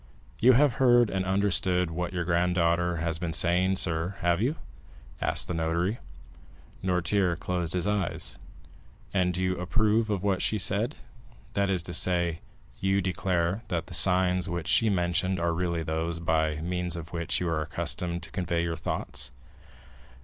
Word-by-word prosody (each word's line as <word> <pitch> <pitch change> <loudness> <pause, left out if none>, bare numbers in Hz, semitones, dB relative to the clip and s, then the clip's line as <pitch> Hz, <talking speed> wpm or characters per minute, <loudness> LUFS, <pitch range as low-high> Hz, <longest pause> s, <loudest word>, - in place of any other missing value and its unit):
"You 125 +3 +6
have 140 +1 +4
heard 120 -3 +5
and 95 -1 -1
understood 95 -2 +1
what 85 +1 -3
your 90 -1 -2
granddaughter 85 0 +1
has 80 -1 -1
been 85 -2 -3
saying, 90 +3 +2
sir, 85 +1 0
have 85 +2 +1
you?" 135 +7 +1 0.7
asked - - 0
the - - -3
notary. 85 +6 -1 0.8
Noirtier 90 0 +1
closed 85 -1 -2
his 90 0 0
eyes. 100 -4 -2 0.7
"And 90 -2 +1
you 95 0 0
approve 110 +4 +1
of 100 -3 -1
what 100 -2 +1
she 110 - +1
said—that 110 0 -2
is 90 -3 0
to 85 - -5
say, 85 -3 +2 0.4
you 95 0 +1
declare 90 0 -1
that 85 -2 -2
the 90 - -11
signs 90 +1 +4
which 85 -1 -4
she 115 - +4
mentioned 90 0 0
are 85 0 0
really 85 -1 -1
those 80 +2 -2
by 80 -2 0
means 90 0 -2
of 85 0 -8
which 85 -1 0
you 90 - -2
are 80 -2 -1
accustomed 85 +2 -3
to - - -6
convey 85 -2 -1
your 85 -1 -2
thoughts?" - - -4
90 Hz, 155 wpm, -27 LUFS, 85-95 Hz, 0.8 s, You